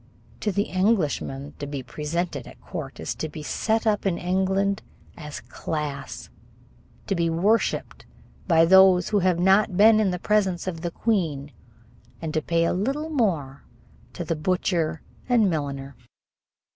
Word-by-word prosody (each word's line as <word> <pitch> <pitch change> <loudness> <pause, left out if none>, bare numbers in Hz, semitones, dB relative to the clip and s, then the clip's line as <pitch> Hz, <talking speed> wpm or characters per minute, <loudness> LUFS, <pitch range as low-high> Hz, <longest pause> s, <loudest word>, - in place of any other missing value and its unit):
To 210 - -1
the 200 +1 +1
Englishman, 165 -9 0
to 145 - -4
be 140 -2 -5
presented 150 0 -3
at - - -13
court - - -7
is - - -3
to 155 - -5
be 150 0 -8
set 225 +8 0
up 210 -2 +1
in 185 -4 0
England 190 +2 0 0.3
as 150 -3 -8
class, 150 -3 -5 0.7
to - - -1
be 170 -2 +1
worshiped 195 +8 0 0.4
by 165 -2 +5
those 190 0 +6
who 210 - +2
have 185 -2 +2
not 190 +1 +3
been 215 +1 +7
in 210 -3 +2
the 180 - -2
presence 190 -3 +1
of 170 -3 -4
the 175 - -2
queen, 165 -9 -1 0.7
and 160 -2 -4
to 155 - +1
pay 165 +1 +1
a - - +1
little 275 - -2
more 160 - -1 0.5
to 175 - -5
the 165 - -1
butcher 165 -1 -1 0.3
and 225 -6 +4
milliner. 140 -3 -4
180 Hz, 155 wpm, -25 LUFS, 155-200 Hz, 0.7 s, been